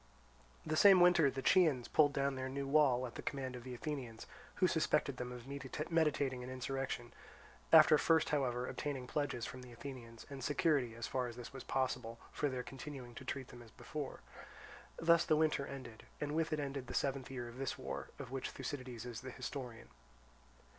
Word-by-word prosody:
The 155 Hz, 0 st, 0 dB
same 195 Hz, +2 st, +8 dB
winter 175 Hz, -4 st, +6 dB
the 135 Hz, 0 st, -5 dB
Chians 150 Hz, -8 st, +4 dB
pulled 145 Hz, -2 st, +5 dB
down 140 Hz, 0 st, 0 dB
their 130 Hz, 0 st, -3 dB
new 140 Hz, +1 st, -3 dB
wall 135 Hz, -4 st, +4 dB
at 120 Hz, -, -7 dB
the -, -, -6 dB
command 130 Hz, -3 st, -3 dB
of 120 Hz, -, -8 dB
the 125 Hz, 0 st, -6 dB
Athenians, 125 Hz, -4 st, -5 dB, 0.3 s
who 185 Hz, -, +3 dB
suspected 150 Hz, -5 st, +2 dB
them 125 Hz, 0 st, -4 dB
of 125 Hz, -1 st, -8 dB, 0.5 s
meditating 145 Hz, -6 st, +2 dB
an 125 Hz, -, -6 dB
insurrection, 130 Hz, -2 st, -3 dB, 0.6 s
after 155 Hz, -2 st, +9 dB
first 160 Hz, -1 st, +3 dB
however 125 Hz, -4 st, 0 dB
obtaining 140 Hz, -4 st, -3 dB
pledges 125 Hz, -3 st, -2 dB
from 130 Hz, -, -7 dB
the 125 Hz, -1 st, -11 dB
Athenians, 120 Hz, -2 st, -9 dB
and 135 Hz, -2 st, -7 dB
security 145 Hz, -5 st, +2 dB
as 115 Hz, 0 st, -4 dB
far 125 Hz, -2 st, -1 dB
as 120 Hz, -, -7 dB
this 120 Hz, +2 st, -8 dB
was 135 Hz, -, -7 dB
possible 125 Hz, -3 st, -1 dB
for 145 Hz, -, 0 dB
their 130 Hz, -1 st, -3 dB
continuing 130 Hz, -2 st, -8 dB
to 125 Hz, -, -9 dB
treat 130 Hz, 0 st, -4 dB
them 120 Hz, -, -11 dB
as 115 Hz, -, -13 dB
before. 145 Hz, +5 st, -6 dB, 0.8 s
Thus 170 Hz, 0 st, +5 dB
the 155 Hz, -, +3 dB
winter 155 Hz, -3 st, +2 dB
ended, 125 Hz, -5 st, -9 dB
and 150 Hz, 0 st, -2 dB
with 160 Hz, +1 st, 0 dB
it 155 Hz, -, 0 dB
ended 140 Hz, -3 st, -4 dB
the -, -, -5 dB
seventh 135 Hz, -2 st, 0 dB
year 125 Hz, -2 st, -5 dB
of 120 Hz, +2 st, -10 dB
this 135 Hz, -1 st, -2 dB
war -, -, -5 dB
of -, -, -8 dB
which 135 Hz, -1 st, -3 dB
Thucydides 130 Hz, -3 st, -6 dB
is 120 Hz, -2 st, -6 dB
the 130 Hz, -, -7 dB
historian. 125 Hz, -3 st, -6 dB
135 Hz, 195 wpm, -36 LUFS, 125-145 Hz, 0.8 s, after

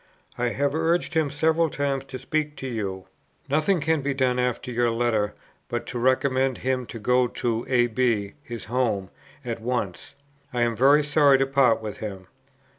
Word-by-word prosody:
I 125 Hz, -, 0 dB
have 140 Hz, +4 st, 0 dB
urged 165 Hz, +2 st, +1 dB
him 160 Hz, -3 st, +2 dB
several 160 Hz, +3 st, +2 dB
times 140 Hz, -2 st, -2 dB
to 135 Hz, -1 st, -7 dB
speak 150 Hz, +3 st, -2 dB
to 135 Hz, -, -6 dB
you. 100 Hz, -6 st, -4 dB, 0.4 s
"Nothing 155 Hz, +6 st, +2 dB
can 160 Hz, 0 st, +1 dB
be 135 Hz, 0 st, -1 dB
done 130 Hz, -2 st, +1 dB
after 125 Hz, 0 st, -1 dB
your 120 Hz, 0 st, +2 dB
letter, 115 Hz, -3 st, 0 dB, 0.3 s
but 120 Hz, -2 st, -3 dB
to 125 Hz, -, -5 dB
recommend 130 Hz, +1 st, +2 dB
him 130 Hz, -1 st, -1 dB
to -, -, -7 dB
go 125 Hz, +3 st, +2 dB
to 115 Hz, -1 st, -2 dB
A. 125 Hz, -2 st, +4 dB
B. 115 Hz, -4 st, 0 dB
(his 120 Hz, -6 st, -7 dB
home) 110 Hz, -5 st, -1 dB, 0.3 s
at 115 Hz, -2 st, -4 dB
once. 110 Hz, -7 st, -3 dB, 0.4 s
I 120 Hz, -1 st, +1 dB
am 115 Hz, -1 st, 0 dB
very 140 Hz, +5 st, +5 dB
sorry 145 Hz, -2 st, +5 dB
to 135 Hz, -, +2 dB
part 135 Hz, -5 st, +3 dB
with 105 Hz, -1 st, -5 dB
him." 95 Hz, -4 st, -6 dB
125 Hz, 180 wpm, -25 LUFS, 115-140 Hz, 0.4 s, very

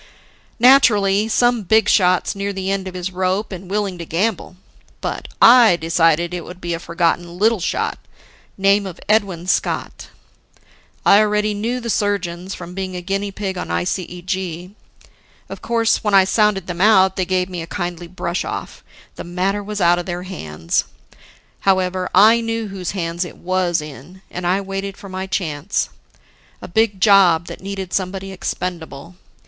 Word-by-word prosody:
"Naturally, 215 Hz, -5 st, +5 dB
some 240 Hz, +1 st, +2 dB
big 220 Hz, +3 st, +3 dB
shot's 185 Hz, -2 st, +3 dB
near 200 Hz, 0 st, -2 dB
the 190 Hz, 0 st, -3 dB
end 195 Hz, -1 st, -2 dB
of 185 Hz, -, -7 dB
his 180 Hz, +1 st, -4 dB
rope 185 Hz, +3 st, -1 dB
and 185 Hz, -1 st, -8 dB
willing 200 Hz, -3 st, -2 dB
to -, -, -4 dB
gamble. 190 Hz, +2 st, -2 dB, 0.4 s
But -, -, -4 dB
I 235 Hz, -5 st, +7 dB
decided 165 Hz, 0 st, +1 dB
it 175 Hz, -2 st, -4 dB
would 180 Hz, 0 st, -11 dB
be 175 Hz, -1 st, -3 dB
a 165 Hz, -, -3 dB
forgotten 170 Hz, 0 st, -1 dB
little 220 Hz, +2 st, +3 dB
shot, 175 Hz, -, -2 dB, 0.6 s
name 200 Hz, +1 st, +3 dB
of 180 Hz, -2 st, -9 dB
Edwin 200 Hz, -5 st, +1 dB
Scott. 185 Hz, -, -2 dB, 1.0 s
I 200 Hz, -, +7 dB
already 210 Hz, 0 st, +1 dB
knew 230 Hz, +5 st, -2 dB
the 235 Hz, -2 st, -3 dB
surgeons 195 Hz, -3 st, -2 dB
from 175 Hz, 0 st, -9 dB
being 190 Hz, -1 st, -4 dB
a 180 Hz, -, -4 dB
guinea 195 Hz, +2 st, -2 dB
pig 195 Hz, -2 st, -4 dB
on -, -, -5 dB
ICEG. 180 Hz, -, -3 dB, 0.8 s
Of -, -, -8 dB
course, 230 Hz, -1 st, +1 dB
when 210 Hz, -2 st, +2 dB
I 195 Hz, -, +7 dB
sounded 200 Hz, -1 st, +1 dB
them 180 Hz, -1 st, -5 dB
out, 190 Hz, -3 st, +5 dB
they 190 Hz, -, 0 dB
gave 185 Hz, 0 st, 0 dB
me 180 Hz, -2 st, -6 dB
a 165 Hz, -, -7 dB
kindly 175 Hz, 0 st, -5 dB
brush 175 Hz, 0 st, -3 dB
off: -, -, -6 dB, 0.3 s
The -, -, -6 dB
matter 185 Hz, +4 st, -2 dB
was 210 Hz, +1 st, -5 dB
out 175 Hz, -1 st, +4 dB
of 175 Hz, -, -6 dB
the 175 Hz, -, -2 dB
their 175 Hz, +1 st, -5 dB
hands. 80 Hz, -, -2 dB, 0.7 s
However, 185 Hz, -1 st, +1 dB
I 220 Hz, +5 st, +6 dB
knew 225 Hz, -1 st, -3 dB
whose 190 Hz, -3 st, -5 dB
hands 170 Hz, 0 st, -2 dB
it 175 Hz, -, -9 dB
was 180 Hz, -2 st, 0 dB
in. 150 Hz, +6 st, -11 dB
And 180 Hz, 0 st, -4 dB
I 190 Hz, +3 st, +1 dB
waited 195 Hz, 0 st, -5 dB
for 200 Hz, -1 st, -11 dB
my 190 Hz, 0 st, -5 dB
chance 175 Hz, -2 st, -2 dB, 0.7 s
a -, -, -9 dB
big 210 Hz, +1 st, +1 dB
job 180 Hz, -4 st, +5 dB
that -, -, -9 dB
needed 195 Hz, -2 st, -6 dB
somebody 195 Hz, +1 st, -3 dB
expendable. 170 Hz, -4 st, -5 dB
190 Hz, 170 wpm, -19 LUFS, 175-200 Hz, 1.0 s, I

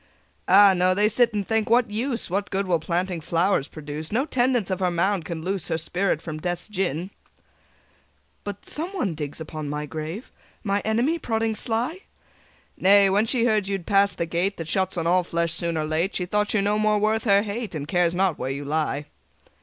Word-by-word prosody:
"Ah, 195 Hz, +1 st, +7 dB
no: 185 Hz, 0 st, +2 dB
they 205 Hz, +2 st, +3 dB
sit 235 Hz, +2 st, +3 dB
and 205 Hz, -2 st, -3 dB
think, 220 Hz, -1 st, 0 dB
'What 235 Hz, -1 st, +3 dB
use! 240 Hz, +3 st, -2 dB
What 195 Hz, +2 st, -2 dB
good 195 Hz, +1 st, -1 dB
will 175 Hz, -3 st, +1 dB
planting 175 Hz, +2 st, -2 dB
flowers 170 Hz, -1 st, +1 dB
produce? 155 Hz, 0 st, -7 dB
No 250 Hz, +6 st, +1 dB
tendance 245 Hz, -, +1 dB
of 185 Hz, -, -1 dB
her 185 Hz, -1 st, +1 dB
mound 175 Hz, +1 st, 0 dB
can 165 Hz, -2 st, -5 dB
loose 190 Hz, -1 st, -2 dB
Her -, -, 0 dB
spirit 175 Hz, +1 st, -1 dB
from 155 Hz, -2 st, -5 dB
Death's 175 Hz, +1 st, -3 dB
gin.'" 185 Hz, -3 st, -2 dB, 1.3 s
"But 205 Hz, -1 st, -7 dB
someone 330 Hz, -, -2 dB
digs 150 Hz, -1 st, -5 dB
upon 155 Hz, -2 st, -6 dB
my 150 Hz, +1 st, -3 dB
grave? 160 Hz, -, -6 dB, 0.3 s
My 200 Hz, -2 st, 0 dB
enemy? 235 Hz, -, 0 dB
prodding 225 Hz, -3 st, -1 dB
sly?" 235 Hz, -, -2 dB, 0.8 s
"Nay: 200 Hz, 0 st, +5 dB
when 205 Hz, +3 st, +2 dB
she 240 Hz, 0 st, +2 dB
heard 215 Hz, -4 st, +1 dB
you 200 Hz, -, -1 dB
had 185 Hz, -4 st, -6 dB
passed 200 Hz, 0 st, +2 dB
the 170 Hz, -, -1 dB
Gate 175 Hz, +4 st, -1 dB
That 165 Hz, -, -6 dB
shuts 190 Hz, +1 st, 0 dB
on 165 Hz, -, -1 dB
all 180 Hz, +2 st, +4 dB
flesh 170 Hz, -1 st, -1 dB
soon 170 Hz, -1 st, 0 dB
or 155 Hz, -, -1 dB
late, 160 Hz, +5 st, -1 dB
She 180 Hz, -, 0 dB
thought 210 Hz, +3 st, 0 dB
you 200 Hz, -, +2 dB
no 210 Hz, +1 st, +1 dB
more 215 Hz, 0 st, +3 dB
worth 215 Hz, +2 st, +1 dB
her 200 Hz, -1 st, +4 dB
hate, 215 Hz, -2 st, -5 dB
And 145 Hz, -1 st, -4 dB
cares 175 Hz, 0 st, +1 dB
not 185 Hz, -3 st, +1 dB
where 130 Hz, -, -3 dB
you 140 Hz, +1 st, -4 dB
lie. 150 Hz, -1 st, -1 dB
190 Hz, 205 wpm, -24 LUFS, 165-215 Hz, 1.3 s, Ah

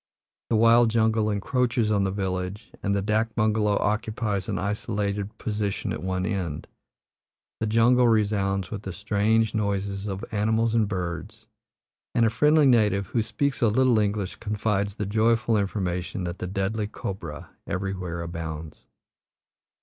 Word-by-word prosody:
The -, -, +2 dB
wild 115 Hz, +1 st, +6 dB
jungle 110 Hz, -1 st, +2 dB
encroaches 115 Hz, +2 st, 0 dB
on 100 Hz, -2 st, +2 dB
the -, -, 0 dB
village, 95 Hz, +1 st, -3 dB
and 100 Hz, -1 st, 0 dB
the 100 Hz, -, 0 dB
dak 110 Hz, +2 st, 0 dB
bungalow 110 Hz, -1 st, +2 dB
occupies 110 Hz, -2 st, -1 dB
an 100 Hz, -, -1 dB
isolated 100 Hz, +1 st, -2 dB
position 105 Hz, -2 st, -2 dB
at -, -, -5 dB
one 95 Hz, 0 st, -1 dB
end. 90 Hz, -8 st, -3 dB, 0.9 s
The 110 Hz, -, -1 dB
jungle 120 Hz, +3 st, +4 dB
resounds 100 Hz, -4 st, +1 dB
with 105 Hz, -2 st, -4 dB
the 95 Hz, -3 st, -6 dB
strange 105 Hz, +3 st, +1 dB
noises 100 Hz, -1 st, -1 dB
of 100 Hz, +2 st, -4 dB
animals 110 Hz, +2 st, +1 dB
and 115 Hz, -3 st, +3 dB
birds, 100 Hz, +3 st, -5 dB, 0.7 s
and 115 Hz, -, +4 dB
a 110 Hz, -, +2 dB
friendly 150 Hz, +5 st, +4 dB
native, 105 Hz, -6 st, +3 dB
who 115 Hz, +5 st, 0 dB
speaks 135 Hz, +5 st, -1 dB
a 120 Hz, -, +5 dB
little 120 Hz, +1 st, +3 dB
English, 100 Hz, -2 st, -1 dB
confides 105 Hz, -2 st, -1 dB
the 105 Hz, -, -3 dB
joyful 115 Hz, +3 st, +2 dB
information 95 Hz, -3 st, -2 dB
that 85 Hz, +1 st, -4 dB
the 90 Hz, -, -3 dB
deadly 95 Hz, +3 st, -1 dB
cobra 95 Hz, -7 st, -6 dB, 0.2 s
everywhere 90 Hz, -3 st, -3 dB
abounds. 80 Hz, -2 st, -6 dB
105 Hz, 145 wpm, -26 LUFS, 95-110 Hz, 0.9 s, wild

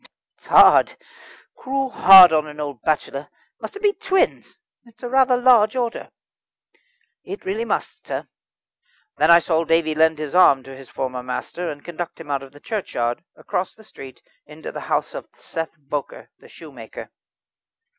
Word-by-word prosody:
"It's -, -, -21 dB
hard -, -, +5 dB, 0.6 s
cruel 270 Hz, 0 st, -3 dB
hard 185 Hz, -5 st, +8 dB
on 155 Hz, -1 st, +1 dB
an 150 Hz, 0 st, -11 dB
old 145 Hz, -6 st, -6 dB
bachelor. 150 Hz, -2 st, -3 dB, 0.3 s
Must -, -, -9 dB
it 405 Hz, -, -10 dB
be 410 Hz, -1 st, +3 dB
twins? 385 Hz, -2 st, -1 dB, 0.3 s
It's 235 Hz, 0 st, -22 dB
a 245 Hz, -, -4 dB
rather 260 Hz, -1 st, +3 dB
large 245 Hz, -3 st, +4 dB
order." 240 Hz, -2 st, -4 dB, 1.1 s
"It 400 Hz, -, -9 dB
really 210 Hz, +5 st, -3 dB
must, -, -, -4 dB
sir." -, -, -5 dB, 0.9 s
Then -, -, +2 dB
I 170 Hz, -, +9 dB
saw 165 Hz, -1 st, 0 dB
David 160 Hz, -1 st, 0 dB
lend 160 Hz, 0 st, +3 dB
his 150 Hz, -2 st, -6 dB
arm 140 Hz, -7 st, +4 dB
to 135 Hz, 0 st, -12 dB
his 135 Hz, -1 st, -14 dB
former 130 Hz, -1 st, -5 dB
master 165 Hz, +7 st, -5 dB
and 145 Hz, -1 st, -9 dB
conduct 175 Hz, 0 st, -7 dB
him 155 Hz, -3 st, -8 dB
out 140 Hz, -1 st, -1 dB
of 135 Hz, -1 st, -13 dB
the 145 Hz, -, -17 dB
churchyard, 120 Hz, -, -4 dB
across 180 Hz, -, -4 dB
the 220 Hz, -, -18 dB
street, 135 Hz, -10 st, -13 dB, 0.2 s
into 150 Hz, +1 st, -10 dB
the -, -, -7 dB
house -, -, -1 dB
of -, -, -8 dB
Seth 165 Hz, 0 st, -7 dB
Bowker, 145 Hz, -1 st, -7 dB
the -, -, -18 dB
shoemaker. -, -, -12 dB
165 Hz, 165 wpm, -21 LUFS, 145-225 Hz, 1.1 s, I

